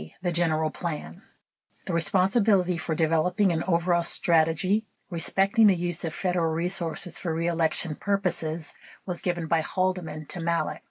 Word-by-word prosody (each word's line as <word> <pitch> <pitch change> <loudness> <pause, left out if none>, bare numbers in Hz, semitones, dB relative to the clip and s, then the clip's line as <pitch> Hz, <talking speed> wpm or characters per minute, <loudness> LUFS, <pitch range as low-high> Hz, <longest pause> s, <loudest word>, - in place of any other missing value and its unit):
The 175 - 0
General 160 -2 0
Plan 150 - -6 0.6
The - - -4
responsibility 185 +3 +2
for 165 -1 -3
developing 165 +5 +2
an 160 -1 -1
overall 170 -1 +2
strategy 170 +5 +2 0.2
respecting 195 +5 +3
the 195 - +5
use 175 -1 -3
of 165 - -2
Federal 175 -1 -1
resources 170 0 0
for 170 - -3
reelection 165 -1 +1
purposes 170 -4 -1 0.3
was 180 -2 -4
given 175 -2 -2
by 160 0 +1
Haldeman 175 -3 -2
to - - -4
Malek. 170 0 -1
170 Hz, 140 wpm, -26 LUFS, 160-185 Hz, 0.6 s, the